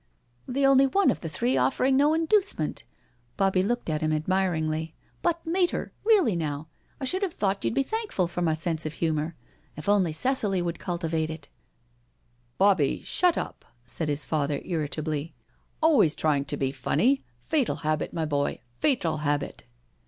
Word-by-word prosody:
The 275 +2 +1
only 270 0 +6
one 390 +8 +3
of - - -5
the 165 - -4
three 130 -3 0
offering 135 - +2
no 290 +3 +4
inducement 330 - +1
I - - -29 0.3
'* 120 0 -39
Bobbie 195 -1 +3
looked 240 +5 -1
at 155 -2 -1
him 155 0 +1
admiringly. 160 -1 0
" - - -37
But, 340 -1 0
Mater, 350 +2 0
really 395 - +4
now, 155 -2 -3 0.3
I 270 - -3
should 370 +9 0
have 380 -5 -2
thought 195 -1 -1
you'd - - 0
be 275 - +3
thankful 425 - -1
for 175 +1 -4
my 160 -2 +2
sense 160 0 0
of 155 - -5
humour. 160 0 -1 0.4
If 150 - -8
only 200 -5 +3
Cicely 205 - +1
would 175 -1 -3
cultivate 165 -3 -2
iti.. 160 -2 -8 0.4
.« 120 0 -40
" 120 0 -40
Bobbiei 185 -8 +3
shut 360 -2 +2
up,^ - - -4 0.2
said 120 +7 -2
his 145 0 -1
father 145 -2 0
irritably. 155 -1 -3 0.2
'' - - -19
Always 245 - +5
trying 145 -3 +1
to - - -2
be 135 -1 0
funny— 235 - +1
fatal 255 - 0
habit, 155 -1 -1
my 165 -2 -2
boy— 145 -2 -1 0.2
fatal 175 - +1
habit." 145 -1 -2
165 Hz, 180 wpm, -27 LUFS, -, 0.4 s, only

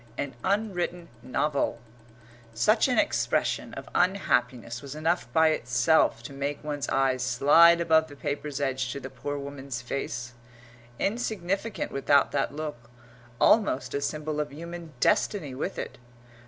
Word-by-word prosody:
AN 140 -2 -3
UNWRITTEN 180 -4 -1
NOVEL 140 +2 0 0.8
Such 215 - +3
an 250 - +1
expression 310 -1 0
of - - -8
unhappiness 125 - +1
was 140 0 -8
enough 155 -5 -1
by 160 +4 +5
itself 125 -3 +2
to 140 - -8
make 140 +1 -3
one's 145 -2 -3
eyes 130 -1 +1
slide 145 +7 +6
above 160 -1 +3
the 145 - -12
paper's 145 0 -4
edge 130 -2 -1
to - - -5
the 135 0 -8
poor 145 0 -4
woman's 140 -2 -6
face 120 -1 -4 0.6
insignificant 205 -1 -2
without 140 +1 +3
that 140 -1 0
look, 145 -5 -6 0.5
almost 205 - +3
a 140 - -1
symbol 150 +1 -2
of 150 -1 -2
human 170 +2 -8
destiny 200 - +1
with 145 +9 -4
it. - - -6
145 Hz, 140 wpm, -27 LUFS, 135-170 Hz, 0.8 s, slide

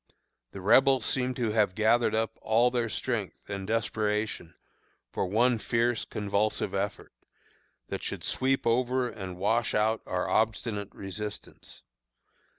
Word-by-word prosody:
The 95 - -9
Rebels 130 +5 +5
seemed 130 -1 0
to 120 -4 -1
have 105 -4 +2
gathered 110 +2 +3
up 110 0 -1
all 115 +3 +3
their 120 -2 0
strength 110 -4 -3
and 100 -1 -5
desperation 105 -5 -1 0.6
for - - -1
one 115 +4 +3
fierce, 115 +1 0
convulsive 100 -1 -1
effort, 100 +1 -3 0.8
that - - -4
should - - -4
sweep 135 +1 0
over 125 +2 +2
and 95 -6 -7
wash 110 +5 +1
out 110 +1 +2
our 90 0 -1
obstinate 110 -2 0
resistance. 105 +2 -8
110 Hz, 130 wpm, -28 LUFS, 100-120 Hz, 0.8 s, Rebels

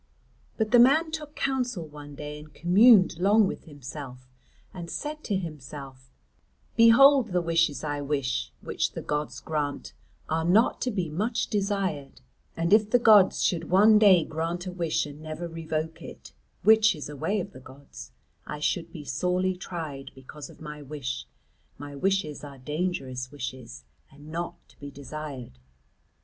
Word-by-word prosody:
But 220 -1 -1
the 240 - +7
man 310 +7 +5
took 300 -2 -6
counsel 250 -10 -2
one 145 -1 -11
day 150 +1 -7
and 150 0 -14
communed 185 +1 +5
long 205 +3 +4
with - - -5
himself 135 -3 -9 0.5
and 170 -2 -7
said 305 +1 -5
to 205 - -1
himself: 140 -6 -8 0.7
"Behold, 250 +3 +7
the 180 -3 0
wishes 165 -3 +1
I 145 -1 -3
wish, 140 -2 -2
which - - -2
the - - -6
gods 150 -3 -3
grant, 145 - -3 0.3
are 160 +1 -1
not 195 +8 +3
to 255 - 0
be 190 -7 -2
much 215 +9 -2
desired; 195 -9 -2 0.4
and 170 +3 +1
if 215 -1 +5
the 245 - +5
gods 215 -5 +5
should 165 -2 0
one 210 +4 +6
day 190 -6 +6
grant 165 +3 -4
a 185 - -4
wish 170 -4 -1
and 145 +1 -10
never 155 +2 -6
revoke 160 -1 -4
it, - - -11 0.3
which 220 -2 +5
is 150 - -7
a 150 - -8
way 200 +9 -1
of 180 - -5
the 130 - -12
gods, 135 +2 -13 0.4
I 150 - -5
should 150 +3 -2
be 150 -3 -9
sorely 180 +7 0
tried 160 -7 -6
because 135 +2 -11
of - - -16
my 150 -1 -8
wish; 135 -3 -5 0.5
my 145 0 -9
wishes 185 -2 -1
are 140 -2 -9
dangerous 135 -3 -3
wishes 130 -3 -7 0.3
and 145 +2 -14
not 170 +1 -4
to - - -24
be 145 - -8
desired." 140 - -8
160 Hz, 160 wpm, -27 LUFS, 145-195 Hz, 0.7 s, the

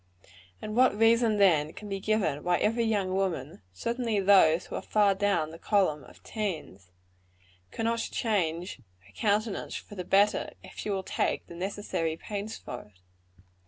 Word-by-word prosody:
And 215 - -4
what 255 -3 +4
reason, 225 0 +4
then, 160 -6 +4
can 210 - -9
be 195 -1 -3
given 195 -8 0
why 175 0 +2
every 230 +2 +1
young 200 -4 0
woman 170 - -2
certainly 230 - -1
those 185 -4 +5
who - - -11
are - - -3
far 205 -2 +3
down 195 -5 0
in - - -11
the 165 - -11
column 185 -9 +1
of - - -17
teens 160 - -5 0.8
cannot 230 - -1
change 180 - -1 0.3
her 100 - -20
countenance 210 0 -1
for - - -8
the 185 -3 -5
better, 200 +3 +2
if - - -12
she - - -5
will 195 -2 -1
take - - -1
the - - -12
necessary 180 -3 -3
pains 210 +3 -5
for 125 - -7
it? 100 -3 -22
195 Hz, 165 wpm, -28 LUFS, 165-215 Hz, 0.8 s, those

